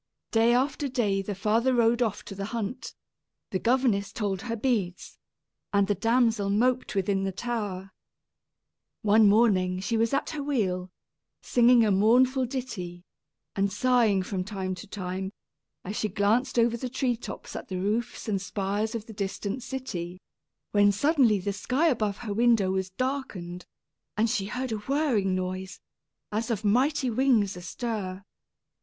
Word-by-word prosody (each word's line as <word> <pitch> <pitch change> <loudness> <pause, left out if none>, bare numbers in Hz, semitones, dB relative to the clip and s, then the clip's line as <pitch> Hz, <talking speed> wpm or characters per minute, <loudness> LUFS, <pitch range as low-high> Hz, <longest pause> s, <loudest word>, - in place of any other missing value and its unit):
Day 230 +1 +4
after 275 +3 0
day 215 -7 0
the 200 +1 -4
father 225 +6 +2
rode 235 0 +3
off 220 -4 -1
to - - -7
the 195 0 -4
hunt, 230 +4 -5 0.6
the 185 - 0
governess 235 -4 +1
told 205 -6 -2
her 230 -1 -3
beads, 210 -7 -2 0.5
and 200 -1 +3
the 205 - +1
damsel 225 0 +2
moped 245 +3 +1
within 195 0 +1
the 195 - -1
tower. 195 -3 -4 1.1
One 215 0 +6
morning 190 -4 +3
she 225 +4 -1
was 225 0 +2
at 275 - 0
her 305 - -4
wheel, 190 -10 -1 0.5
singing 240 -1 +5
a 210 - +2
mournful 250 +6 +4
ditty, 185 -10 -5 0.5
and 200 0 +1
sighing 225 -3 +3
from 185 -1 -3
time 190 -2 -4
to 185 +4 -9
time, 190 0 -4 0.5
as 200 +3 -4
she 215 - 0
glanced 220 +7 +1
over 235 0 +3
the 250 +2 -4
tree 255 -1 0
tops 230 - -8
at - - -6
the 185 - -4
roofs 215 +7 -2
and 200 -3 0
spires 200 +4 -2
of 220 -2 -4
the 225 - -10
distant 200 +3 -3
city, 185 -10 -5 0.5
when 205 -1 +5
suddenly 255 -1 +3
the 200 +1 -2
sky 265 +10 +1
above 215 -7 0
her 210 - -2
window 225 -4 +3
was 190 0 -1
darkened, 190 -7 -4 0.5
and 220 +1 +2
she 195 -1 -1
heard 250 +3 -3
a 220 - -1
whirring 225 -6 +1
noise, 185 +1 -4 0.5
as 220 +3 -2
of 220 -2 -2
mighty 255 +4 +2
wings 225 -5 +2
astir. 190 0 -4
215 Hz, 155 wpm, -27 LUFS, 195-245 Hz, 1.1 s, One